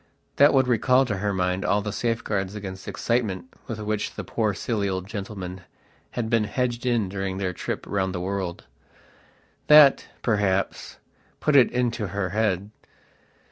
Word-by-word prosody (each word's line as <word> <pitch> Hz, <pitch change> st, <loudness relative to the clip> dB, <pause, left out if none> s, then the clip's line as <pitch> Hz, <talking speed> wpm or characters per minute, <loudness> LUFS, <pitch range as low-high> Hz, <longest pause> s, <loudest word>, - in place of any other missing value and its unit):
That 145 Hz, +1 st, +7 dB
would 130 Hz, -2 st, +3 dB
recall 125 Hz, +2 st, +3 dB
to 105 Hz, -5 st, -2 dB
her 100 Hz, +2 st, -1 dB
mind 90 Hz, 0 st, -1 dB
all 100 Hz, 0 st, +1 dB
the 105 Hz, -, -3 dB
safeguards 105 Hz, -4 st, -2 dB
against 95 Hz, -2 st, -7 dB
excitement 115 Hz, -1 st, -2 dB
with 115 Hz, -3 st, -5 dB
which 105 Hz, 0 st, -2 dB
the -, -, -5 dB
poor 110 Hz, -3 st, -1 dB
silly 105 Hz, -1 st, -1 dB
old 95 Hz, -1 st, -3 dB
gentleman 95 Hz, -3 st, -6 dB, 0.6 s
had 120 Hz, -2 st, 0 dB
been 110 Hz, -1 st, +2 dB
hedged 120 Hz, +3 st, -2 dB
in 115 Hz, -5 st, +2 dB
during 95 Hz, 0 st, -3 dB
their 95 Hz, -2 st, -2 dB
trip -, -, -4 dB
round 95 Hz, -2 st, -1 dB
the -, -, -2 dB
world. 95 Hz, -3 st, -3 dB, 1.0 s
That, 150 Hz, -2 st, +7 dB, 0.2 s
perhaps, 100 Hz, -4 st, 0 dB, 0.4 s
put 150 Hz, -, +1 dB
it 130 Hz, -3 st, +7 dB
into 120 Hz, -3 st, -1 dB
her 95 Hz, 0 st, -2 dB
head. 105 Hz, -1 st, 0 dB
105 Hz, 155 wpm, -25 LUFS, 95-120 Hz, 1.0 s, That